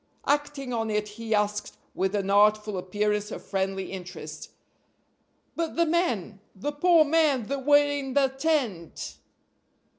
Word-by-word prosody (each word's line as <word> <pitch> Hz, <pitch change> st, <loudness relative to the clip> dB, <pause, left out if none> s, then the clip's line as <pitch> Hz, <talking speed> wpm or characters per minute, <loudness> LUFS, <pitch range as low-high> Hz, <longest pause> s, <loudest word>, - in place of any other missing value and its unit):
Acting 290 Hz, -2 st, -1 dB
on 225 Hz, -1 st, -1 dB
it 210 Hz, 0 st, -1 dB
he 220 Hz, +1 st, -2 dB
asked, 210 Hz, 0 st, -1 dB, 0.2 s
with 190 Hz, +2 st, -1 dB
an 195 Hz, -1 st, -1 dB
artful 210 Hz, 0 st, +4 dB
appearance 210 Hz, +3 st, -1 dB
of -, -, -8 dB
friendly 195 Hz, -1 st, -2 dB
interest: 185 Hz, -1 st, -8 dB, 1.1 s
"But 330 Hz, -1 st, -2 dB
the 335 Hz, -, +3 dB
men? 245 Hz, -, 0 dB, 0.2 s
the 245 Hz, +10 st, -3 dB
poor 320 Hz, +2 st, +5 dB
men 300 Hz, -5 st, +3 dB
that 275 Hz, 0 st, -3 dB
were 290 Hz, 0 st, +7 dB
in 280 Hz, -2 st, -3 dB
the 275 Hz, -2 st, +4 dB
tent?" 265 Hz, -, -2 dB
225 Hz, 140 wpm, -27 LUFS, 205-290 Hz, 1.1 s, were